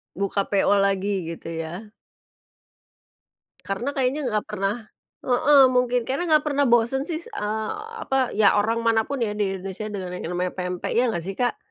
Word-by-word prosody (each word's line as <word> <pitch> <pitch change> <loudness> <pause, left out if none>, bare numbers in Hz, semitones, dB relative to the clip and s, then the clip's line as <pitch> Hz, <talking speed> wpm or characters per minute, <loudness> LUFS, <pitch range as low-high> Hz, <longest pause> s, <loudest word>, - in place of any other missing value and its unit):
Buka 200 +1 -1
PO 200 0 +2
lagi 195 -2 0
gitu 165 - -9
ya. 170 +6 -6 1.7
Karena 195 +8 -2
kayaknya 270 +2 0
nggak 215 -3 -1
pernah 200 0 -1 0.5
heeh 270 +3 +5
mungkin, 250 -1 +2
karena 275 +6 -1
nggak 305 -1 +5
pernah 285 -1 +2
bosen 240 +3 +3
sih 335 0 -4
eee 215 +1 -3 0.3
apa? 265 -2 +1
Ya 210 -2 +5
orang 225 +3 +1
manapun 230 +4 +1
ya 210 - -2
di 205 -2 -1
Indonesia 195 +3 -6
dengan 190 -3 -5
yang 180 -1 -5
namanya 180 0 -1
pempek 180 -1 -3
ya 245 - +5
nggak 170 -7 -2
sih 195 0 -4
Kak? 245 -1 +1
210 Hz, 165 wpm, -24 LUFS, 195-250 Hz, 1.7 s, heeh